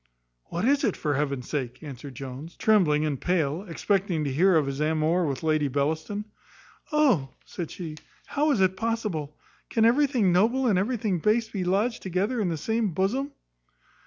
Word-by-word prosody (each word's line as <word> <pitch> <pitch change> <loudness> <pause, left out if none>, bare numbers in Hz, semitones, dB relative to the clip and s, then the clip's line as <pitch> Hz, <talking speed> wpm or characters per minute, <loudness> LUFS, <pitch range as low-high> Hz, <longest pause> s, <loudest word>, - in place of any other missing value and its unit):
"What 175 +5 -3
is 280 +2 +3
it, 210 - +1
for 150 -2 -1
heaven's 140 -3 -2
sake?" 130 -2 -4
answered 140 -2 -8
Jones, 135 +5 -8
trembling 160 -9 +3
and 145 -4 -2
pale, 165 -3 0
expecting 185 -2 0
to 140 -2 -2
hear 180 +6 +4
of 155 -3 +3
his 135 0 -4
amour 160 +3 +1
with 140 +2 -3
Lady 155 -2 +2
Bellaston. 155 +9 -2 0.7
"Oh," 260 - +3 0.2
said 170 -3 -6
she, 160 -4 -7 0.3
"how 300 +2 0
is 235 -9 +2
it 190 0 +3
possible! 200 -9 -3 0.3
can 225 -1 +3
everything 245 -5 +3
noble 235 +8 +3
and 205 -7 +3
everything 210 -3 0
base 220 +5 +2
be 195 -3 -3
lodged 205 +7 0
together 195 +6 -1
in 190 - 0
the 165 - -2
same 220 +1 -1
bosom?" 255 - 0
180 Hz, 170 wpm, -26 LUFS, 150-220 Hz, 0.7 s, hear